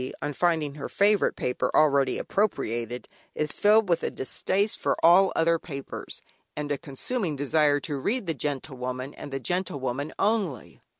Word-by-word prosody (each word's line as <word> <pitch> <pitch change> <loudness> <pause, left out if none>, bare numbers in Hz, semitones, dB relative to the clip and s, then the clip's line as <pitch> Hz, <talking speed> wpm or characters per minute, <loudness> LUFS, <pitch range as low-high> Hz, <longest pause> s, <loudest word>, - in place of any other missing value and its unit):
on 145 - -3
finding 160 -3 +1
her 145 -1 -6
favourite 205 0 +3
paper 125 - -1
already 140 -3 +4
appropriated, 120 - -1 0.3
is 150 -1 -1
filled 210 +1 +4
with 170 -2 +2
a - - -1
distaste 195 +9 -1
for - - +1
all 185 +3 +7
other 165 0 +3
papers, 140 -5 -7 0.3
and 150 0 -3
a 145 - +1
consuming 170 - -3
desire 145 +1 +2
to 145 0 -3
read 220 - -1
"The 165 - -1
Gentlewoman," 130 -2 -4
and 145 - -9
"The 135 - -3
Gentlewoman" 140 -3 -2
only. 200 - -1
150 Hz, 155 wpm, -26 LUFS, 135-185 Hz, 0.3 s, all